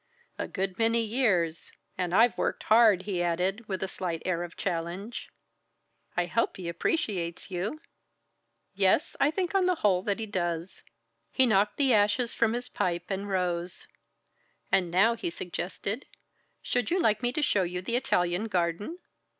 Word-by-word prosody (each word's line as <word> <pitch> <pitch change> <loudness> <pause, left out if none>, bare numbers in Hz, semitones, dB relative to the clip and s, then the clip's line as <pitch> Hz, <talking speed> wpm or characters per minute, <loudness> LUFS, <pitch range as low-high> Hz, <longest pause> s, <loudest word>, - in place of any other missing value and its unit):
"A - - -2
good 190 0 -3
many 230 0 +3
years 210 -9 0 0.2
and 180 -2 -2
I've 225 +6 +5
worked - - -1
hard!" 215 -4 +5
he 190 -3 -2
added, 185 +6 -1
with 190 -2 -3
a - - -1
slight 175 -3 -4
air 175 -2 0
of 175 0 -7
challenge. 180 +5 -4 0.9
"I 175 - +2
hope 230 +6 0
he 180 -2 -6
appreciates 170 - -2
you?" 195 +12 -3 0.9
"Yes, 195 - +2
I 280 - +4
think 360 +3 -2
on 380 -2 +3
the 365 - +3
whole 185 -3 +4
that 200 +1 -1
he 225 - -3
does." 175 -3 -3 0.5
He 260 - +4
knocked 210 -2 +2
the 270 -3 +4
ashes 210 +3 +3
from 230 -1 +2
his 245 +1 -3
pipe 175 -4 -2
and 195 +1 -3
rose. 180 -2 -2 0.9
"And 180 -3 +3
now," 195 +7 +4
he 225 - -3
suggested, 185 +7 -5 0.6
"should 245 0 0
you 360 +2 +1
like 215 -9 +2
me 245 -1 +1
to 305 - -1
show 205 - +3
you 180 0 -3
the 235 +5 -1
Italian 180 -6 +1
garden?" 185 - -1
195 Hz, 165 wpm, -28 LUFS, 175-230 Hz, 0.9 s, I've